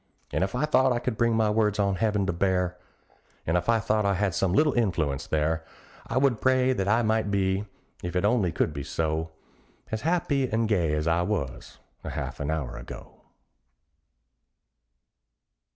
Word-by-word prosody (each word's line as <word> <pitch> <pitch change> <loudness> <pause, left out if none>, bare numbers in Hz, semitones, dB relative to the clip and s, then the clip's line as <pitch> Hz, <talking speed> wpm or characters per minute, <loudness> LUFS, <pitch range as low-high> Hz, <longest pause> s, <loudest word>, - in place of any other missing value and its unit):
And - - 0
if 95 +5 -2
I 130 +5 +1
thought 130 -3 +3
I 120 - +1
could 120 -1 -2
bring 115 0 +2
my 110 -1 +2
words 105 -1 +1
on 100 -2 +1
heaven 105 -2 +1
to 95 - -1
bear, 90 0 0 0.7
And 80 - 0
if 90 - 0
I 115 - +5
thought 110 0 +1
I 100 -1 +2
had 95 -1 0
some 95 0 +1
little 150 - +3
influence 85 - 0
there, 80 +1 0 0.4
I - - -2
would 130 -4 +2
pray 130 0 +3
that 95 -5 -2
I 115 +3 +3
might 110 -1 +1
be, 95 0 0 0.4
if 90 +1 -5
it 90 +2 +1
only 105 -5 +2
could 80 - 0
be 70 - -5
so. 80 +2 -2 0.6
As 110 0 -2
happy 145 -5 +1
and 115 +1 +1
gay 85 -8 +1
as 75 0 -1
I 85 +1 +2
was 90 - -3 0.3
a - - -5
half - - -5
an 70 - -3
hour 75 -6 -3
ago. 60 - -10
100 Hz, 185 wpm, -27 LUFS, 85-115 Hz, 0.7 s, I